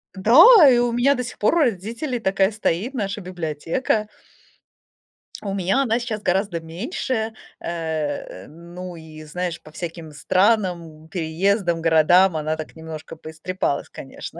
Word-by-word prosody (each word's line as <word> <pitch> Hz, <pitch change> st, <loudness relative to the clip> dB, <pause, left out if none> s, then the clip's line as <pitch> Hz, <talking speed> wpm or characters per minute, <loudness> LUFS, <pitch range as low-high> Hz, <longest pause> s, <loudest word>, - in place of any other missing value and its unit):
Да, 230 Hz, -, +7 dB, 0.3 s
и 245 Hz, -, +5 dB
у 240 Hz, 0 st, +2 dB
меня 250 Hz, +4 st, +3 dB
до 250 Hz, -, -3 dB
сих 240 Hz, -, -8 dB
пор 215 Hz, +11 st, +2 dB
у -, -, +2 dB
родителей 235 Hz, -, -1 dB
такая 195 Hz, -1 st, +1 dB
стоит 215 Hz, +3 st, -2 dB
наша 205 Hz, -4 st, -3 dB
библиотека. 180 Hz, -, -2 dB, 1.4 s
У 200 Hz, -2 st, -3 dB
меня 195 Hz, +7 st, +1 dB
она 235 Hz, -1 st, +1 dB
сейчас 225 Hz, -3 st, -4 dB
гораздо 190 Hz, -1 st, 0 dB
меньше, 220 Hz, -, -4 dB, 0.3 s
э. 155 Hz, -, -4 dB
Ну 175 Hz, +3 st, -10 dB
и, 160 Hz, -1 st, -11 dB
знаешь, 170 Hz, +2 st, -4 dB
по 155 Hz, -, -15 dB
всяким 165 Hz, -1 st, -7 dB
странам, 185 Hz, +2 st, +1 dB, 0.2 s
м, -, -, -17 dB
переездам, 170 Hz, +2 st, 0 dB
городам 165 Hz, +3 st, +4 dB
она 155 Hz, +1 st, -1 dB
так 155 Hz, -, -8 dB
немножко 160 Hz, 0 st, -9 dB
поистрепалась, 160 Hz, 0 st, -4 dB
конечно. -, -, -9 dB
180 Hz, 140 wpm, -22 LUFS, 160-220 Hz, 1.4 s, Да